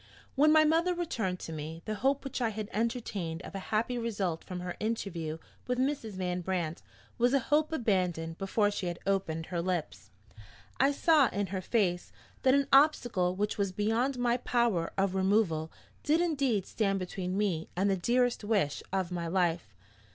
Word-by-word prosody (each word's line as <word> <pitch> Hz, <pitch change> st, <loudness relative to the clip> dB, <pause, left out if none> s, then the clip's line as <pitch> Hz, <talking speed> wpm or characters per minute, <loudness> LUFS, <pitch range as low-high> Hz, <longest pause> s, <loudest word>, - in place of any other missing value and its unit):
When 300 Hz, +3 st, +5 dB
my 310 Hz, 0 st, +7 dB
mother 335 Hz, +3 st, +2 dB
returned 225 Hz, -, -2 dB
to 165 Hz, -, -6 dB
me, 160 Hz, +2 st, -6 dB
the 215 Hz, -, -2 dB
hope 270 Hz, +6 st, +1 dB
which 270 Hz, -2 st, -4 dB
I 235 Hz, -, +2 dB
had 215 Hz, -1 st, -5 dB
entertained 205 Hz, -7 st, -2 dB
of -, -, -9 dB
a 195 Hz, -, -4 dB
happy 235 Hz, +3 st, 0 dB
result 200 Hz, -8 st, -2 dB
from 180 Hz, -1 st, -6 dB
her 180 Hz, 0 st, -5 dB
interview 175 Hz, -8 st, -3 dB, 0.3 s
with 250 Hz, 0 st, 0 dB
Mrs. 260 Hz, -5 st, -1 dB
Van 180 Hz, -1 st, -2 dB
Brandt 175 Hz, -3 st, -2 dB, 0.4 s
was 245 Hz, +3 st, +4 dB
a -, -, +4 dB
hope 310 Hz, +1 st, +3 dB
abandoned 180 Hz, -, -1 dB
before 205 Hz, +1 st, +1 dB
she 195 Hz, -3 st, -3 dB
had 175 Hz, 0 st, -3 dB
opened 190 Hz, -5 st, -1 dB
her 170 Hz, 0 st, -2 dB
lips. 175 Hz, -3 st, -3 dB, 0.7 s
I 275 Hz, +2 st, +5 dB
saw, 300 Hz, -1 st, +4 dB
in 205 Hz, +1 st, -1 dB
her 190 Hz, -, -1 dB
face, 185 Hz, -4 st, 0 dB, 0.3 s
that 260 Hz, +1 st, +4 dB
an 280 Hz, 0 st, +3 dB
obstacle 240 Hz, -11 st, +4 dB
which 210 Hz, +2 st, -2 dB
was 200 Hz, -2 st, +1 dB
beyond 225 Hz, +7 st, 0 dB
my 245 Hz, 0 st, +2 dB
power 235 Hz, -9 st, +1 dB
of 195 Hz, -1 st, +1 dB
removal 190 Hz, -5 st, +1 dB, 0.3 s
did 310 Hz, +3 st, +2 dB
indeed 275 Hz, -, +1 dB
stand 195 Hz, -3 st, 0 dB
between 185 Hz, 0 st, -3 dB
me 185 Hz, -6 st, -1 dB
and 190 Hz, +3 st, +1 dB
the 195 Hz, -, +3 dB
dearest 240 Hz, +5 st, +1 dB
wish 205 Hz, -9 st, 0 dB
of 190 Hz, -2 st, -1 dB
my 170 Hz, -1 st, -3 dB
life. 170 Hz, -, 0 dB
200 Hz, 180 wpm, -30 LUFS, 180-245 Hz, 0.7 s, my